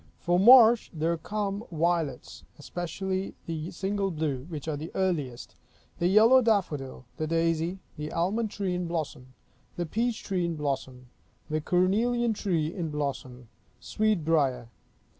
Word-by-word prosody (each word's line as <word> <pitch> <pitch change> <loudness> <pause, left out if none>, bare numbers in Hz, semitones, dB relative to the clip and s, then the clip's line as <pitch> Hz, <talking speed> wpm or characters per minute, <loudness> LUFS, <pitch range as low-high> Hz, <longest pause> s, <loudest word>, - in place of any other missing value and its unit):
For 175 +1 +1
March, 235 +1 +7
there 165 0 0
come 205 +3 -3
violets, 165 -5 -1
specially 185 +5 -4
the 165 0 -4
single 195 +2 -2
blue, 150 -6 -3
which 155 -3 -6
are 155 - -1
the 155 +3 -6
earliest; 150 -10 -2 0.5
the 175 - +2
yellow 225 +7 +6
daffodil; 155 - -1
the 155 - -2
daisy; 165 +2 0 0.2
the 150 0 -5
almond 205 +7 0
tree 195 -3 -3
in 180 -1 -2
blossom; 140 -6 -5 0.4
the 175 - -2
peach 230 +7 -2
tree 185 -3 -1
in 170 -1 -1
blossom; 130 -4 -4 0.4
the 155 0 0
cornelian 225 +8 +2
tree 170 -6 -1
in 170 -5 -3
blossom; 135 -4 -4 0.3
sweet 215 -7 0
briar. 135 -7 +1
170 Hz, 140 wpm, -28 LUFS, 150-195 Hz, 0.5 s, March